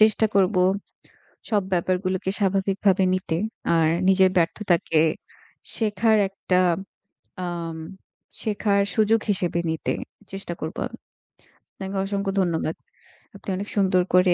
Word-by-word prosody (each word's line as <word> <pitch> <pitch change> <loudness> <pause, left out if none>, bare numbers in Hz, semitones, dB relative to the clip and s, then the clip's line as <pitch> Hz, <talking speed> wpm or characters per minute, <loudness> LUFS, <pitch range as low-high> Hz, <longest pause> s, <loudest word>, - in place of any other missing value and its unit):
চেষ্টা 215 +1 +5
করবো 190 -1 +3 0.9
সব 210 -3 +2
ব্যাপারগুলোকে 185 +1 0
স্বাভাবিকভাবে 195 -1 +2
নিতে 185 -3 -1 0.4
আর 160 -1 +4 0.2
নিজের 190 0 +5
ব্যর্থতাকে 170 -2 +2 0.7
শেখার 220 0 +2
একটা, 190 -1 0 0.9
আম 170 -2 -4 0.6
শেখার 205 -1 +1
সুযোগ 220 +1 +4
হিসেবে 175 -3 0
নিতে 160 0 -1 0.4
চেষ্টা 195 -2 -5
করবো 160 +1 -4
আমি। - - -12 0.8
আপনাকে 190 0 -6
অসংখ্য 200 0 -2
ধন্যবাদ। 165 -3 -1 0.6
আপনি 200 - -9
অনেক 200 +2 -4
সুন্দর 190 -3 +3
করে 180 0 +5
190 Hz, 110 wpm, -24 LUFS, 175-200 Hz, 0.9 s, চেষ্টা